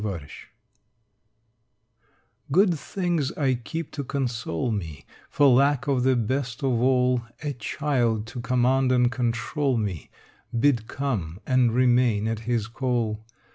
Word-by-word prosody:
XXIV 90 Hz, -9 st, -5 dB, 2.2 s
Good 185 Hz, +4 st, +4 dB
things 170 Hz, -2 st, -2 dB
I 135 Hz, -3 st, +1 dB
keep 140 Hz, +6 st, -5 dB
to 140 Hz, -, -4 dB
console 120 Hz, -, -2 dB
me 80 Hz, -9 st, -5 dB, 0.2 s
For 145 Hz, -, +3 dB
lack 140 Hz, +1 st, +4 dB
of 135 Hz, -3 st, +1 dB
the 130 Hz, +1 st, +3 dB
best 125 Hz, +1 st, -2 dB
of 125 Hz, -4 st, +1 dB
all, 125 Hz, -1 st, +3 dB, 0.2 s
A 145 Hz, -1 st, -2 dB
child 120 Hz, -3 st, -1 dB
to 120 Hz, +2 st, -7 dB
command 125 Hz, +2 st, +2 dB
and 125 Hz, -1 st, +3 dB
control 125 Hz, +3 st, -1 dB
me, 100 Hz, -9 st, -3 dB, 0.5 s
Bid 120 Hz, -4 st, +2 dB
come 105 Hz, -, -3 dB
and 130 Hz, -2 st, +3 dB
remain 120 Hz, -3 st, +3 dB
at 115 Hz, -1 st, -2 dB
his 115 Hz, -3 st, +1 dB
call. 115 Hz, -2 st, -2 dB
125 Hz, 130 wpm, -25 LUFS, 115-135 Hz, 2.2 s, Good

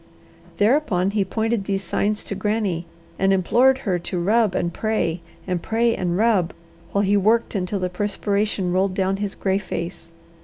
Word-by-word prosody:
Thereupon 205 Hz, -5 st, +2 dB
he 205 Hz, -1 st, +1 dB
pointed 220 Hz, +1 st, -1 dB
these 195 Hz, -1 st, -1 dB
signs 210 Hz, +2 st, -1 dB
to -, -, -5 dB
Granny, 200 Hz, -4 st, -1 dB, 0.3 s
and 195 Hz, 0 st, +3 dB
implored 245 Hz, +8 st, +4 dB
her 185 Hz, -4 st, +1 dB
to 175 Hz, +1 st, -4 dB
rub 210 Hz, +2 st, +2 dB
and 170 Hz, 0 st, -1 dB
pray, 180 Hz, -6 st, -1 dB, 0.2 s
and 180 Hz, -2 st, -2 dB
pray 230 Hz, +3 st, +1 dB
and 175 Hz, -1 st, -1 dB
rub, 210 Hz, -6 st, +2 dB, 0.4 s
while 200 Hz, -, +1 dB
he 200 Hz, +1 st, +2 dB
worked 220 Hz, +4 st, +2 dB
until 195 Hz, 0 st, -1 dB
the 185 Hz, -1 st, -1 dB
perspiration 200 Hz, 0 st, -1 dB
rolled 185 Hz, +1 st, +1 dB
down 190 Hz, 0 st, 0 dB
his 205 Hz, -1 st, -3 dB
gray 190 Hz, 0 st, 0 dB
face. 170 Hz, -3 st, -6 dB
195 Hz, 165 wpm, -22 LUFS, 185-215 Hz, 0.4 s, implored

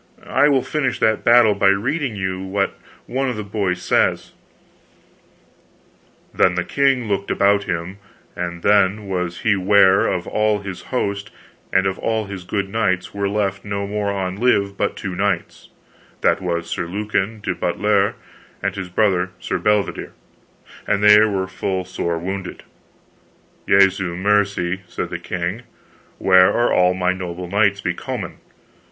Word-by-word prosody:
I 145 Hz, -, +5 dB
will 135 Hz, -3 st, +2 dB
finish 150 Hz, -4 st, -1 dB
that 110 Hz, 0 st, +1 dB
battle 120 Hz, -3 st, +6 dB
by 100 Hz, -1 st, +2 dB
reading 120 Hz, +6 st, 0 dB
you 95 Hz, -1 st, -3 dB
what 100 Hz, +1 st, -1 dB, 0.3 s
one 135 Hz, +2 st, -1 dB
of 125 Hz, -, -3 dB
the 105 Hz, -, -4 dB
boys 100 Hz, -3 st, -2 dB
says: -, -, +1 dB, 2.0 s
Then 90 Hz, -, +3 dB
the 90 Hz, -, 0 dB
king 135 Hz, -2 st, +1 dB
looked 100 Hz, -1 st, -2 dB
about 100 Hz, 0 st, +2 dB
him, 85 Hz, +3 st, -4 dB, 0.4 s
and 85 Hz, -1 st, -5 dB
then 100 Hz, 0 st, +3 dB
was 90 Hz, -2 st, -3 dB
he 110 Hz, -2 st, +2 dB
ware 95 Hz, 0 st, +4 dB
of 90 Hz, -, -2 dB
all 105 Hz, -1 st, 0 dB
his 95 Hz, -2 st, -6 dB
host 100 Hz, -5 st, -2 dB, 0.4 s
and 95 Hz, 0 st, +2 dB
of 95 Hz, -1 st, -1 dB
all 110 Hz, -1 st, -1 dB
his 100 Hz, -2 st, -8 dB
good 100 Hz, +1 st, -2 dB
knights 95 Hz, -4 st, -1 dB
were 100 Hz, 0 st, -1 dB
left 100 Hz, -1 st, -1 dB
no 100 Hz, -1 st, -3 dB
more 105 Hz, 0 st, -2 dB
on 95 Hz, -2 st, -3 dB
live 100 Hz, -4 st, +1 dB
but 100 Hz, -, -1 dB
two 95 Hz, -3 st, -5 dB
knights, -, -, -2 dB, 0.5 s
that -, -, +2 dB
was 85 Hz, -2 st, -2 dB
Sir 85 Hz, -, -3 dB
Lucan 105 Hz, +2 st, -2 dB
de 100 Hz, -3 st, -2 dB
Butlere, 100 Hz, +3 st, +1 dB, 0.5 s
and -, -, -1 dB
his 95 Hz, -2 st, -5 dB
brother 95 Hz, -2 st, +1 dB
Sir -, -, -3 dB
Bedivere: 105 Hz, -1 st, 0 dB, 0.7 s
and 100 Hz, -, +1 dB
they 105 Hz, 0 st, +8 dB
were 100 Hz, -3 st, 0 dB
full 95 Hz, 0 st, -3 dB
sore 85 Hz, -2 st, -3 dB
wounded. 95 Hz, +2 st, -5 dB, 1.1 s
Jesu 95 Hz, -2 st, +3 dB
mercy, 95 Hz, -1 st, +1 dB
said -, -, -5 dB
the -, -, -4 dB
king, 90 Hz, +5 st, -4 dB, 0.6 s
where 95 Hz, -1 st, +5 dB
are 120 Hz, 0 st, +1 dB
all 90 Hz, 0 st, +3 dB
my 90 Hz, 0 st, +1 dB
noble 90 Hz, -1 st, -6 dB
knights 100 Hz, +1 st, +2 dB
becomen? -, -, -4 dB
100 Hz, 150 wpm, -20 LUFS, 95-105 Hz, 2.0 s, they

